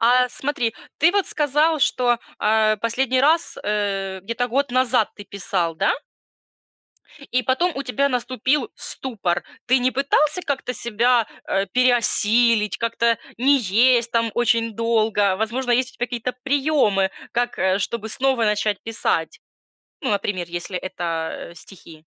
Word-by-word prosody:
А, 250 Hz, +2 st, +4 dB
смотри, 245 Hz, -3 st, -2 dB, 0.2 s
ты 320 Hz, +4 st, +5 dB
вот 400 Hz, -1 st, +1 dB
сказал, 300 Hz, +2 st, +1 dB
что, 245 Hz, -3 st, +2 dB, 0.2 s
а, 215 Hz, 0 st, +3 dB
последний 255 Hz, +3 st, 0 dB
раз, 320 Hz, +5 st, +2 dB
э, 195 Hz, -2 st, -2 dB
где-то 230 Hz, +4 st, -2 dB
год 275 Hz, +3 st, 0 dB
назад 250 Hz, -3 st, +2 dB
ты 205 Hz, -, -10 dB
писал, 185 Hz, -4 st, -2 dB
да? -, -, +2 dB, 1.4 s
И 255 Hz, +1 st, +2 dB
потом 340 Hz, +9 st, +1 dB
у 275 Hz, -, -2 dB
тебя 275 Hz, +2 st, 0 dB
наступил 255 Hz, +2 st, -1 dB
ступор. 190 Hz, -9 st, -3 dB, 0.2 s
Ты 255 Hz, +1 st, +4 dB
не 250 Hz, +1 st, +1 dB
пытался 285 Hz, +6 st, +1 dB
как-то 270 Hz, -4 st, -3 dB
себя, 235 Hz, 0 st, +1 dB, 0.2 s
э, 195 Hz, +1 st, 0 dB
переосилить, 235 Hz, -1 st, +3 dB
как-то 230 Hz, -1 st, +1 dB, 0.2 s
не 275 Hz, +3 st, +4 dB
есть 235 Hz, +2 st, +3 dB
там 230 Hz, -1 st, +1 dB
очень 230 Hz, -1 st, +1 dB
долго? 215 Hz, -3 st, +1 dB
Возможно, 240 Hz, +5 st, -2 dB
есть 255 Hz, +2 st, +1 dB
у -, -, -25 dB
тебя 245 Hz, -, -2 dB
какие-то 245 Hz, 0 st, -4 dB
приёмы, 270 Hz, -9 st, +2 dB, 0.2 s
как, 240 Hz, 0 st, -1 dB
э, 190 Hz, +1 st, +2 dB
чтобы 220 Hz, +2 st, -3 dB
снова 260 Hz, 0 st, +1 dB
начать 210 Hz, -1 st, 0 dB
писать? 210 Hz, -7 st, -2 dB, 0.6 s
Ну, 265 Hz, -, -1 dB
например, 195 Hz, -3 st, -2 dB
если 175 Hz, +2 st, -4 dB
это, 170 Hz, -3 st, -4 dB
э, -, -, -16 dB
стихи. 165 Hz, -3 st, -14 dB
235 Hz, 145 wpm, -22 LUFS, 205-255 Hz, 1.4 s, ты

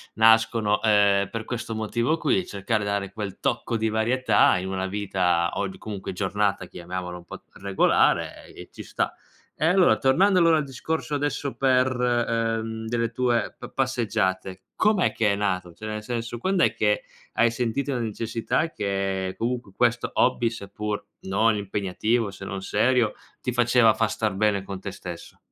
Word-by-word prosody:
nascono, 110 Hz, -1 st, +4 dB
uhm, 100 Hz, -2 st, +4 dB
per 115 Hz, -1 st, -4 dB
questo 120 Hz, -2 st, -4 dB
motivo 115 Hz, +8 st, 0 dB
qui, 185 Hz, +2 st, +1 dB
cercare 105 Hz, +2 st, -2 dB
di 100 Hz, -, -2 dB
dare 100 Hz, -1 st, -2 dB
quel 100 Hz, -3 st, -6 dB
tocco 120 Hz, -3 st, -1 dB
di 110 Hz, 0 st, 0 dB
varietà 120 Hz, +4 st, +3 dB
in 95 Hz, -, -4 dB
una 95 Hz, 0 st, -2 dB
vita 95 Hz, -4 st, 0 dB
o 100 Hz, -, -1 dB
di 95 Hz, -, -10 dB
comunque 100 Hz, -3 st, -6 dB
giornata, 100 Hz, -1 st, -1 dB
chiamiamolo 90 Hz, 0 st, -6 dB
un 85 Hz, -, -14 dB
po' -, -, -9 dB
regolare, 100 Hz, -1 st, +1 dB
e -, -, -11 dB
ci -, -, -9 dB
sta. -, -, -2 dB, 0.4 s
E 155 Hz, -, -1 dB
allora 180 Hz, 0 st, +5 dB
tornando 185 Hz, +9 st, +3 dB
allora 165 Hz, -1 st, +5 dB
al 155 Hz, -, 0 dB
discorso 145 Hz, +3 st, -3 dB
adesso 145 Hz, -1 st, -2 dB
per, 130 Hz, -1 st, +3 dB
uhm, 115 Hz, -2 st, -1 dB
delle 115 Hz, 0 st, -1 dB
tue 120 Hz, -1 st, 0 dB
pa -, -, -9 dB
passeggiate, 105 Hz, -7 st, -1 dB
com'è 210 Hz, -4 st, +3 dB
che 105 Hz, -3 st, +2 dB
è -, -, +1 dB
nato? 90 Hz, -4 st, -2 dB
Cioè 110 Hz, -, -10 dB
nel 105 Hz, 0 st, -4 dB
senso, 115 Hz, 0 st, -4 dB
quand'è 190 Hz, +5 st, +2 dB
che -, -, +1 dB, 0.3 s
hai 115 Hz, -, +3 dB
sentito 125 Hz, +4 st, -1 dB
la 125 Hz, -, -1 dB
necessità 115 Hz, +7 st, -2 dB
che 95 Hz, -2 st, -2 dB
comunque 120 Hz, -3 st, -3 dB
questo 120 Hz, -1 st, +1 dB
hobby, 120 Hz, -2 st, +2 dB
seppur 105 Hz, -1 st, -5 dB, 0.2 s
non 105 Hz, +3 st, +2 dB
impegnativo, 100 Hz, +2 st, -1 dB
se 95 Hz, 0 st, -9 dB
non 95 Hz, 0 st, -5 dB
serio, 115 Hz, +2 st, +2 dB, 0.3 s
ti 125 Hz, -, -2 dB
faceva 120 Hz, -2 st, +4 dB
far 115 Hz, -1 st, 0 dB
star 110 Hz, -3 st, -1 dB
bene 100 Hz, -1 st, +1 dB
con 100 Hz, -1 st, -6 dB
te 100 Hz, -, -5 dB
stesso? 85 Hz, -2 st, -9 dB
110 Hz, 165 wpm, -25 LUFS, 100-120 Hz, 0.4 s, allora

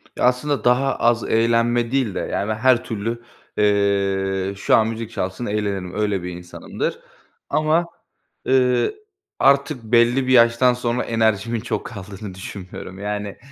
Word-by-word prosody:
Ya, -, -, -3 dB
aslında 130 Hz, +3 st, +1 dB
daha 125 Hz, +2 st, +2 dB
az 120 Hz, -1 st, +2 dB
eğlenme 115 Hz, +1 st, +1 dB
değil 130 Hz, -7 st, 0 dB
de, -, -, -1 dB
yani, 105 Hz, +2 st, -2 dB
her 120 Hz, +2 st, +3 dB
türlü, 115 Hz, +2 st, -4 dB, 0.4 s
eee, 100 Hz, -2 st, +1 dB
şu -, -, +3 dB
an 110 Hz, 0 st, +3 dB
müzik 115 Hz, 0 st, -5 dB
çalsın 95 Hz, +6 st, -4 dB
eğlenirim, 100 Hz, -4 st, -2 dB
öyle 105 Hz, -4 st, -1 dB
bir 90 Hz, -, -4 dB
insanımdır. 90 Hz, 0 st, -5 dB, 0.5 s
Ama, 155 Hz, +3 st, +2 dB, 0.6 s
eee, 125 Hz, -, +2 dB, 0.4 s
artık 140 Hz, -2 st, +3 dB
belli 120 Hz, +3 st, +3 dB
bir 130 Hz, -, +1 dB
yaştan 120 Hz, +1 st, +5 dB
sonra 120 Hz, 0 st, -1 dB
enerjimin 115 Hz, 0 st, 0 dB
çok 110 Hz, -2 st, -4 dB
kaldığını 100 Hz, -1 st, -8 dB
düşünmüyorum. 95 Hz, 0 st, -9 dB
Yani, 105 Hz, 0 st, -4 dB
115 Hz, 140 wpm, -21 LUFS, 100-125 Hz, 0.6 s, yaştan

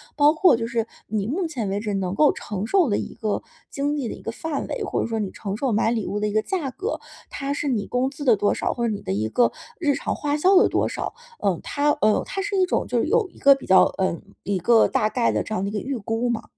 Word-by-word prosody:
包 295 Hz, +1 st, +5 dB
括 345 Hz, -3 st, +5 dB
就 230 Hz, 0 st, -2 dB
是 230 Hz, -1 st, -1 dB, 0.2 s
你 210 Hz, -1 st, -2 dB
目 345 Hz, +8 st, -1 dB
前 250 Hz, -10 st, -3 dB
为 200 Hz, +1 st, -1 dB
止 210 Hz, -2 st, -3 dB
能 190 Hz, -1 st, -2 dB
够 300 Hz, -, +5 dB
承 205 Hz, 0 st, -5 dB
受 350 Hz, -, +3 dB
的 205 Hz, -, +1 dB
一 -, -, -5 dB
个 215 Hz, -2 st, -2 dB, 0.3 s
经 285 Hz, +1 st, -1 dB
济 270 Hz, -5 st, -2 dB
的 -, -, -4 dB
一 -, -, -13 dB
个 225 Hz, -, -4 dB
范 300 Hz, +4 st, -4 dB
围， 470 Hz, -, -3 dB
或 -, -, -1 dB
者 -, -, -1 dB
说 225 Hz, -1 st, -2 dB
你 205 Hz, -3 st, -2 dB
承 200 Hz, -1 st, -5 dB
受 260 Hz, 0 st, 0 dB
买 220 Hz, +2 st, +2 dB
礼 225 Hz, -4 st, -1 dB
物 205 Hz, -, -2 dB
的 210 Hz, -, +1 dB
一 -, -, -2 dB
个 215 Hz, -, +2 dB
价 345 Hz, -, -2 dB
格， 420 Hz, -, -4 dB, 0.3 s
它 280 Hz, 0 st, -3 dB
是 290 Hz, -, -3 dB
你 230 Hz, -7 st, 0 dB
工 255 Hz, +2 st, 0 dB
资 285 Hz, +1 st, -8 dB
的 245 Hz, -5 st, +5 dB
多 205 Hz, +1 st, +2 dB
少， -, -, -1 dB
或 235 Hz, -2 st, -1 dB
者 215 Hz, -, 0 dB
你 200 Hz, -, -5 dB
的 -, -, -4 dB
一 105 Hz, +2 st, -1 dB
个 240 Hz, -, +2 dB, 0.3 s
日 295 Hz, -5 st, +2 dB
常 280 Hz, -, -2 dB
花 295 Hz, 0 st, -1 dB
销 375 Hz, +5 st, +4 dB
的 -, -, +5 dB
多 -, -, +1 dB
少？ -, -, -4 dB, 0.3 s
呃， 190 Hz, -5 st, 0 dB
它， 290 Hz, +1 st, +1 dB
呃， 215 Hz, 0 st, +3 dB
它 390 Hz, -, -3 dB
是 405 Hz, 0 st, -2 dB
一 370 Hz, -, +4 dB
种 -, -, -1 dB
就 240 Hz, -1 st, 0 dB
是 -, -, +1 dB
有 435 Hz, +2 st, +2 dB
一 -, -, -22 dB
个 275 Hz, 0 st, +6 dB
比 270 Hz, -, -11 dB
较， 190 Hz, -, +7 dB
呃， 185 Hz, -3 st, 0 dB, 0.3 s
一 200 Hz, -1 st, -1 dB
个 225 Hz, +5 st, +4 dB
大 215 Hz, -, +1 dB
概 240 Hz, 0 st, +1 dB
的 -, -, 0 dB
这 220 Hz, -, -6 dB
样 190 Hz, -, -1 dB
的 200 Hz, -, -1 dB
一 -, -, -7 dB
个 210 Hz, -, -1 dB
预 270 Hz, +3 st, -3 dB
估 225 Hz, +3 st, -2 dB
吗？ 235 Hz, -2 st, -1 dB
235 Hz, 310 characters per minute, -23 LUFS, 210-290 Hz, 0.3 s, 较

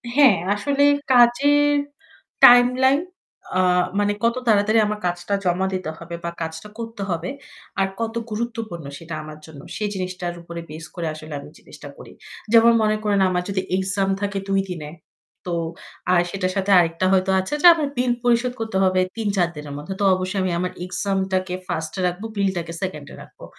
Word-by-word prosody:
হ্যাঁ, 275 Hz, -8 st, +7 dB, 0.2 s
আসলে 280 Hz, +7 st, 0 dB, 0.3 s
কাজের 285 Hz, +4 st, +5 dB, 0.7 s
টাইমলাইন 250 Hz, +3 st, +6 dB, 0.6 s
আ -, -, +3 dB, 0.4 s
মানে 205 Hz, 0 st, +2 dB
কত 230 Hz, +1 st, +2 dB
তাড়াতাড়ি 215 Hz, +1 st, +4 dB
আমার 210 Hz, 0 st, -3 dB
কাজটা 175 Hz, +2 st, -2 dB
জমা 180 Hz, +2 st, +1 dB
দিতে 185 Hz, -4 st, -3 dB
হবে? 170 Hz, 0 st, -7 dB
বা 170 Hz, -, -2 dB
কাজটা 160 Hz, +4 st, -5 dB
করতে 225 Hz, -2 st, -6 dB
হবে 170 Hz, 0 st, -2 dB, 0.5 s
আর 195 Hz, -, +3 dB
কত 230 Hz, 0 st, -3 dB, 0.2 s
গুরুত্বপূর্ণ 220 Hz, -, -4 dB
সেটা 165 Hz, 0 st, -9 dB
আমার 155 Hz, 0 st, -10 dB
জন্য? 150 Hz, -3 st, -12 dB
সেই 210 Hz, -1 st, -2 dB
জিনিসটার 185 Hz, -2 st, -4 dB
উপর 170 Hz, 0 st, -10 dB
বেস 155 Hz, +1 st, -8 dB
করে 170 Hz, -2 st, -3 dB
আসলে 155 Hz, 0 st, -9 dB
আমি 140 Hz, -, -11 dB
জিনিসটা -, -, -13 dB
করি। -, -, -12 dB, 0.4 s
যেমন 230 Hz, 0 st, +7 dB
মনে 215 Hz, 0 st, +2 dB
করেন 205 Hz, -2 st, +2 dB
আমার 180 Hz, -1 st, -1 dB
যদি 195 Hz, -1 st, -1 dB, 0.2 s
এক্সাম 195 Hz, +1 st, 0 dB
থাকে 200 Hz, -1 st, -2 dB
২ 195 Hz, 0 st, +2 dB
দিনে, 160 Hz, -5 st, -6 dB, 0.6 s
তো 175 Hz, -, -3 dB, 0.6 s
আর 175 Hz, -1 st, +5 dB
সেটার 185 Hz, -1 st, -2 dB
সাথে 195 Hz, +1 st, 0 dB
আরেকটা 165 Hz, +2 st, +1 dB
হয়তো 190 Hz, 0 st, +2 dB
আছে 190 Hz, +9 st, -4 dB
যা -, -, +9 dB
আমি 310 Hz, -3 st, -1 dB
বিল 250 Hz, 0 st, +2 dB
পরিশোধ 245 Hz, +1 st, +2 dB
করতে 220 Hz, -4 st, -2 dB
হবে 185 Hz, -1 st, +3 dB, 0.2 s
৩-৪ 200 Hz, -6 st, 0 dB
দিনের 150 Hz, -1 st, -8 dB
মধ্যে। 150 Hz, +6 st, -6 dB
তো -, -, 0 dB
অবশ্যই 185 Hz, +2 st, -3 dB
আমি 185 Hz, -, 0 dB
আমার 180 Hz, 0 st, -2 dB
এক্সামটাকে 190 Hz, -1 st, -1 dB
1st-এ 160 Hz, 0 st, -4 dB
রাখবো, 180 Hz, +5 st, -4 dB
বিলটাকে 190 Hz, -4 st, -1 dB
2nd-এ 155 Hz, -7 st, -5 dB
রাখবো। -, -, -13 dB
190 Hz, 170 wpm, -22 LUFS, 175-225 Hz, 0.7 s, যা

